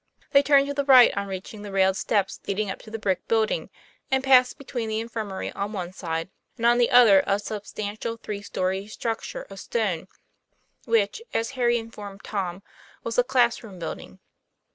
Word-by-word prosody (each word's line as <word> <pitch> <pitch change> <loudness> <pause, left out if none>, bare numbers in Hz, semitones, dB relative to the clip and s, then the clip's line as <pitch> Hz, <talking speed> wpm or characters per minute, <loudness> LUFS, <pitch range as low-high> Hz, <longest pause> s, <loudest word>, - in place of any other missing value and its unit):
They 280 - +6
turned 280 -1 +4
to 285 - -3
the 280 0 0
right 260 -3 +7
on 200 0 -2
reaching 195 +2 -7
the 205 -1 -7
railed 190 -1 +3
steps 200 -1 0
leading 200 0 -1
up - - -7
to 220 - -13
the 225 - -4
brick 195 -4 -1
building, 220 -1 +1 0.4
and 265 0 +1
passed 255 -2 +5
between 245 -5 -4
the 220 0 -1
infirmary 220 -4 -4
on 200 +2 -4
one 180 -3 -5
side 165 -1 -4 0.3
and 230 - -2
on 240 +1 +5
the 240 - +4
other 225 -6 +7
a 200 - +3
substantial 215 +2 -5
three 210 -2 -6
story 190 0 -2
structure 225 +1 -4
of 195 -1 -11
stone, 195 -7 -2 0.8
which, 225 - +1
as 230 +2 0
Harry 240 -3 +2
informed 205 -4 -9
Tom, 190 -2 -4 0.4
was 230 - -4
the 245 - +5
class 245 -2 +2
room 205 -5 -11
building. 165 -2 -7
215 Hz, 185 wpm, -25 LUFS, 195-240 Hz, 0.8 s, right